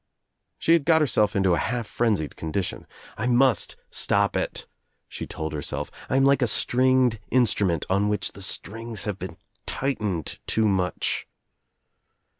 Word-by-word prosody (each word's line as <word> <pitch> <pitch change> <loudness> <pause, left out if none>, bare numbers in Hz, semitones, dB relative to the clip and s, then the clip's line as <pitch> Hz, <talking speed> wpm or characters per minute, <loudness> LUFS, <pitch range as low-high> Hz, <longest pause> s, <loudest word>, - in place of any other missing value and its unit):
She 165 - +3
had 165 -3 +4
got 160 +1 +4
herself 105 -8 +2
into 95 -2 +3
a 85 - +2
half 120 +5 -2
frenzied 105 -9 -1
condition. 80 +4 -4 0.3
"I 115 - -1
must 125 -1 +3 0.2
stop - - +1
it," - - -2 0.4
she - - -7
told 80 -1 -5
herself. 75 -2 -4 0.2
"I 130 - +2
am 135 - +4
like 140 0 +4
a 125 - +3
stringed 125 0 +3
instrument 100 - +2
on 100 +2 +1
which 105 - -1
the 100 - -12
strings 110 +2 -1
have 105 -3 -3
been - - -7 0.3
tightened 105 - -2
too 110 -1 +2
much." 95 -3 -1
110 Hz, 150 wpm, -25 LUFS, 95-125 Hz, 0.4 s, had